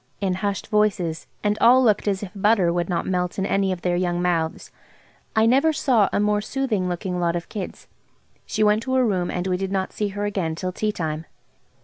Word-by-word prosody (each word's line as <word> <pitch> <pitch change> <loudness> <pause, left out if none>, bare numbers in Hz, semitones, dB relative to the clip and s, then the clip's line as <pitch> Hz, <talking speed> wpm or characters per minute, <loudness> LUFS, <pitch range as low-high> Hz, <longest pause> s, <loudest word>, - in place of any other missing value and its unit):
in 195 -2 0
hushed 195 +1 -2
voices, 205 -6 0 0.2
and 210 0 0
all 250 +3 +6
looked 215 -3 +2
as 195 0 0
if 195 - -6
butter 200 -4 +3
would 175 0 -1
not 175 - -1
melt 180 -1 -1
in 190 - 0
any 195 -1 +1
of 180 -2 -5
their 180 -1 +1
young 175 -1 0
mouths. 170 -2 -1 0.6
I 220 0 +4
never 270 +7 +4
saw 245 -8 +2
a - - 0
more 210 0 +2
soothing 215 -6 -1
looking 180 +1 -3
lot 170 -1 +1
of 175 - -5
kids. 200 -4 -6 0.6
She - - 0
went 210 +1 +3
to 260 +2 -2
her 255 -1 +4
room, 185 -5 0
and 180 0 -3
we 185 -1 0
did 195 0 -3
not 190 -1 -2
see 210 - -1
her 205 +1 -3
again 190 -6 -2
till 185 +2 -3
tea 210 +3 -1
time. 160 -4 -4
195 Hz, 220 wpm, -23 LUFS, 180-210 Hz, 0.6 s, all